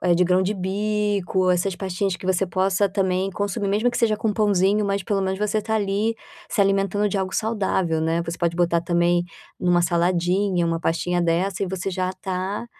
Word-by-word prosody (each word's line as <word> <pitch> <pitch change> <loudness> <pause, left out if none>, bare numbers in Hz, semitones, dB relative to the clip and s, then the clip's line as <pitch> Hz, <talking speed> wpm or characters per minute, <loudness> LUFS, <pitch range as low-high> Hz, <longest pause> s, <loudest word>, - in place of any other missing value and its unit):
de 180 - +3
grão 180 +1 +3
de 190 +3 0
bico, 200 -1 0
essas 180 +1 0
pastinhas 190 0 -2
que - - -11
você 190 +1 +1
possa 190 +2 +1
também 190 -1 0
consumir 200 0 -2
mesmo 215 +5 +1
que 240 - -3
seja 220 -2 +2
com 215 0 -1
pãozinho, 205 0 +2
mas 200 0 -1
pelo 200 -1 0
menos 190 0 -1
você 210 +1 0
está 220 +1 -1
ali 210 +2 0 0.3
se 205 - +1
alimentando 195 +1 +1
de 195 - -1
algo 190 0 -2
saudável, 190 -7 0
né, 165 +1 0
você 170 0 -5
pode 170 -1 0
botar 170 -1 +2
também 175 0 +1 0.3
em 180 - -2
uma 175 0 +4
saladinha 175 +2 +1
uma 165 0 -1
pastinha 175 +2 0
dessa 175 +3 0
e 190 - -2
você 190 +1 -3
já 185 0 -1
está 190 +3 -4
190 Hz, 195 wpm, -23 LUFS, 175-205 Hz, 0.3 s, uma